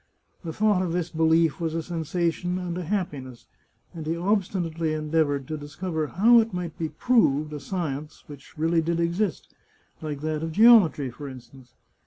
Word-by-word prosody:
The 165 - -4
thought 210 +1 +2
of 175 -3 -2
this 175 -1 -2
belief 160 0 +2
was 165 -1 -2
a 165 - -2
sensation 175 +1 -2
and 180 -2 -4
a 180 -1 -4
happiness, 145 - -4 0.5
and 160 -2 -7
he 165 +1 -1
obstinately 175 -4 -1
endeavoured 150 -3 0
to 155 - -3
discover 155 +2 -4
how 230 +9 +5
it 225 -4 -1
might 175 -3 -4
be 160 -1 -2
proved 150 - +2
a. 150 - -5
science 150 -2 -5
which 145 +1 -13
really 165 +2 +2
did 170 +1 -1
exist, 170 +1 -1 0.5
like 150 -3 -5
that 155 0 -2
of 160 0 -4
geometry, 200 - +6
for 145 +4 -9
instance. 130 -1 -13
165 Hz, 170 wpm, -25 LUFS, 150-180 Hz, 0.5 s, geometry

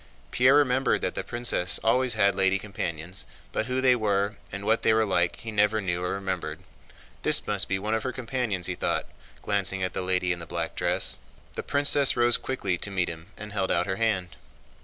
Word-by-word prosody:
Pierre 130 +3 +5
remembered 135 -2 +2
that - - -1
the - - -3
princess 120 -7 0
always 125 +1 +2
had 100 -2 +4
lady 95 0 +2
companions, 90 -4 -5 0.2
but 110 - -2
who 130 +1 0
they 130 -1 +5
were 100 -2 0 0.2
and 100 +1 -5
what 110 +2 +2
they 110 - +3
were 110 0 +3
like 85 -3 +1
he 115 - -8
never 105 +1 +2
knew 90 -3 -2
or 90 - -1
remembered. 95 -2 -4 0.6
"This - - +3
must - - 0
be 95 - 0
one 105 +3 -2
of 110 - 0
her 130 - -3
companions," 120 -7 -2
he 90 - -1
thought, - - -1 0.4
glancing 95 -2 0
at 90 - -2
the - - -2
lady 90 -1 0
in 90 - -2
the 85 - -9
black - - -3
dress. - - 0 0.3
The - - -4
princess 140 -1 +3
rose 120 0 +4
quickly 110 -9 -2
to - - 0
meet 95 -2 -1
him 80 +1 -8
and 105 -1 -7
held 95 -2 0
out - - +2
her 95 -1 -2
hand. 105 -6 0
100 Hz, 210 wpm, -26 LUFS, 95-120 Hz, 0.6 s, Pierre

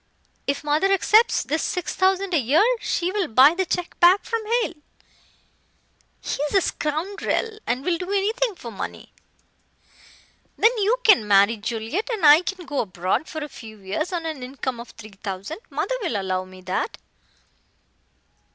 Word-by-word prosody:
If 280 +2 -1
mother 300 +7 +1
accepts 425 +4 +4
this 315 +3 -1
six 360 - -2
thousand 380 0 +1
a 325 - +4
year, 280 - +3
she 355 -3 -1
will 395 -3 -1
buy 265 +6 +6
the 375 +1 -2
check 355 +1 -3
back 360 +3 +5
from 460 -1 -2 0.2
Hale. - - -4 1.5
He's 295 +6 -3
a 385 - +5
scoundrel 395 +9 -2
and 255 +4 -1
will 340 -2 0
do 360 0 -5
anything 435 +3 0
for 235 -8 -9
money. 195 - -7 1.4
Then 460 +3 +4
you 425 +5 +2
can 390 - +5
marry 200 +2 +5
Juliet, 225 - -3
and 415 -8 -1
I 295 +3 +8
can 365 -1 -5
go 290 -2 -3
abroad 185 - -1
for 315 -1 -5
a - - -5
few 220 -6 -12
years 195 - -3
on 340 -2 -3
an 310 -5 -4
income 255 -1 -5
of 235 - -9
three 215 -2 -13
thousand. 200 - -5
Mother - - -2
will 240 - -1
allow 185 -1 -2
me 185 0 -14
that." 185 - -3
315 Hz, 160 wpm, -23 LUFS, -, 1.5 s, I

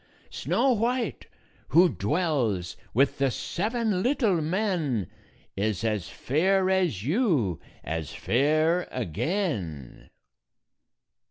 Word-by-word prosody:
Snow 270 - +1
White, 235 0 -1 0.4
who 170 +7 +6
dwells 110 - -1 0.2
with 135 +4 +2
the 135 -1 +3
seven 215 - -1
little 225 - +2
men, 160 - 0 0.5
Is 105 +1 -1
as 105 -6 -1
fair 185 +7 +1
as 175 - +1
you, 150 - +1 0.2
as 80 0 -3
fair 155 +7 +1
again." 110 - -3
155 Hz, 90 wpm, -27 LUFS, -, 0.5 s, who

